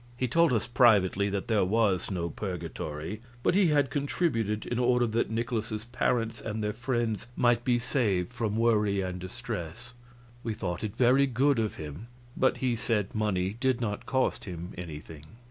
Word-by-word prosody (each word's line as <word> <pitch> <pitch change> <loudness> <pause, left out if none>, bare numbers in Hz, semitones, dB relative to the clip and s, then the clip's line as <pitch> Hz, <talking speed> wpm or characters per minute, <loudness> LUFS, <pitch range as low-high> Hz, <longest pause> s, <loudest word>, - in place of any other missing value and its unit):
He 125 - 0
told 165 +4 +4
us 115 -4 +1
privately 105 -5 +4
that 100 -1 -3
there 110 -4 +3
was 100 -1 +1
no 85 -3 -2
purgatory, 90 0 -5 0.2
but - - +3
he 195 -1 +4
had 145 -3 +2
contributed 130 - 0
in 120 - -2
order 125 0 +3
that 115 0 0
Nikolaus's 110 -1 -2
parents 115 -1 -1
and 110 -1 -3
their 105 0 -1
friends 120 -2 -2
might 120 -1 +3
be 120 -1 +3
saved 115 -5 0
from 110 -3 -1
worry 105 -4 +2
and 90 -1 -4
distress. 95 +5 -6 0.5
We 115 -2 -2
thought 90 -3 -4
it 105 -2 -4
very 130 +3 +4
good 135 +1 +2
of 110 -2 -1
him, 80 +8 -8 0.3
but 130 - +2
he 125 -2 0
said 110 -2 -1
money 100 -3 0
did 130 -1 +1
not 105 -4 -3
cost 130 0 0
him 90 -1 -6
anything. 80 -3 -8
110 Hz, 170 wpm, -29 LUFS, 95-120 Hz, 0.5 s, told